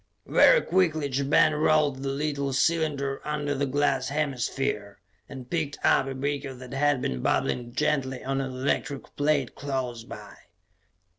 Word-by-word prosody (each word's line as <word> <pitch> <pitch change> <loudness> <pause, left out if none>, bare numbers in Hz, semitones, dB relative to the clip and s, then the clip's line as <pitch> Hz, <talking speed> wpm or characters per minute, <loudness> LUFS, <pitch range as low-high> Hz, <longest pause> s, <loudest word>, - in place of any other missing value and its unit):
Very - - +6
quickly 160 -6 +1
Ja 135 +1 -1
Ben 145 +2 +4
rolled 150 -3 +2
the 135 - -2
little 140 -1 -2
cylinder 140 -2 0
under 150 -1 -2
the 140 0 -1
glass 135 -1 +1
hemisphere, 135 -7 -2 0.3
and 130 -3 -9
picked 155 -1 -2
up 135 - +4
a 135 - -4
beaker 140 0 -3
that 125 0 -10
had 140 -1 +1
been 65 -1 -2
bubbling 120 - 0
gently 130 -3 -1
on 135 +1 -1
an 135 - -3
electric 135 +1 -3
plate 145 -3 +1
close 130 -5 -4
by. - - -10
140 Hz, 150 wpm, -26 LUFS, 130-145 Hz, 0.3 s, Very